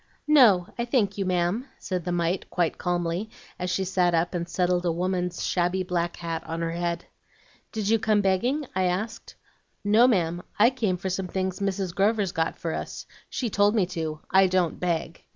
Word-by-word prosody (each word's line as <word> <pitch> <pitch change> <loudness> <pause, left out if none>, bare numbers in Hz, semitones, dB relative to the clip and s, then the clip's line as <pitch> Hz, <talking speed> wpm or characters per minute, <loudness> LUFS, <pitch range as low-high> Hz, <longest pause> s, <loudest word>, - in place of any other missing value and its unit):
"'No, 235 -12 +6
I 235 - 0
thank 210 -5 +1
you, 195 - 0
ma'am,' 185 +7 0
said 180 -3 -4
the 180 - -1
mite 175 +1 -1
quite 175 -3 0
calmly, 175 +3 -1 0.3
as 180 - -2
she 190 +2 0
sat 180 -2 +2
up 165 +2 +1
and 170 -1 -3
settled 180 0 +1
a 175 - +1
woman's 180 +1 -1
shabby 180 +1 +1
black 175 -1 -1
hat 165 -1 -4
on 165 +1 -4
her 165 0 -1
head. 170 0 -2 0.7
"'Did 215 -3 -3
you 225 +1 +3
come 215 -1 +2
begging?' 235 +10 +1
I 185 0 +1
asked. 190 +5 -3 0.5
"'No, 215 +4 +5
ma'am, 175 -7 +1 0.2
I 230 +4 +6
came 215 -8 -1
for 190 +1 -3
some 190 0 -2
things 185 +1 -2
Mrs. 195 -2 -2
Grover's 200 0 +2
got 165 -2 -1
for 165 -1 -3
us. - - -5 0.2
She 240 -4 -2
told 205 +2 +3
me 205 -5 +3
to. 160 -3 -4
I 190 0 +6
don't 180 -3 0
beg.' 170 -2 -2
185 Hz, 190 wpm, -26 LUFS, 175-205 Hz, 0.7 s, No